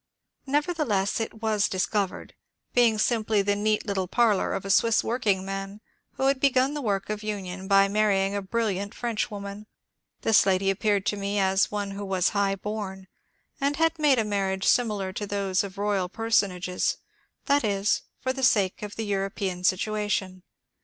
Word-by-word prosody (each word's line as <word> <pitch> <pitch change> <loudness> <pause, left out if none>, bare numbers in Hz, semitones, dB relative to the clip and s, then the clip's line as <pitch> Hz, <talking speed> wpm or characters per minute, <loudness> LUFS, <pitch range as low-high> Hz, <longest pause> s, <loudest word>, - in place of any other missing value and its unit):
Nevertheless 285 - 0
it 225 0 -5
was 215 -2 +1
dis 185 -1 0
covered,— 200 -3 -3 0.4
being 235 -3 +4
simply 215 -2 +1
the 205 0 +1
neat 215 +1 0
little 195 -3 -1
parlor 220 -1 +2
of 195 - -5
a 195 - 0
Swiss 230 +3 +4
workingman 195 -3 -2 0.3
who - - -4
had 275 0 +2
begun 265 0 +3
the 295 - -3
work 205 -4 -1
of 210 0 -4
union 190 -3 -5
by 195 0 +5
marrying 200 -1 +1
a 200 - -1
brilliant 200 -1 -2
Frenchwoman. 210 -3 -4 0.5
This 220 -2 +5
lady 195 0 +2
appeared 200 0 0
to 205 - 0
me 200 +1 -2
as 190 0 +2
one 205 -1 -3
who 200 +1 -6
was 190 -2 +1
high 200 -1 +1
bom 195 -2 -5 0.5
and 280 +1 0
had 325 +1 +1
made 290 -4 +4
a 225 - +1
marriage 195 -2 -1
similar 210 -6 +1
to 205 +2 -4
those 195 -2 0
of 195 0 -8
royal 200 -3 0
personages, 195 -4 0 0.5
that 285 -1 +3
is, 200 -1 +1 0.2
for 260 - -1
the 265 - -5
sake 200 -7 +2
of 210 -1 -6
the 225 - -3
European 195 -2 -2
sit 185 +1 +2
uation. 205 -3 -2
205 Hz, 170 wpm, -26 LUFS, 195-220 Hz, 0.5 s, by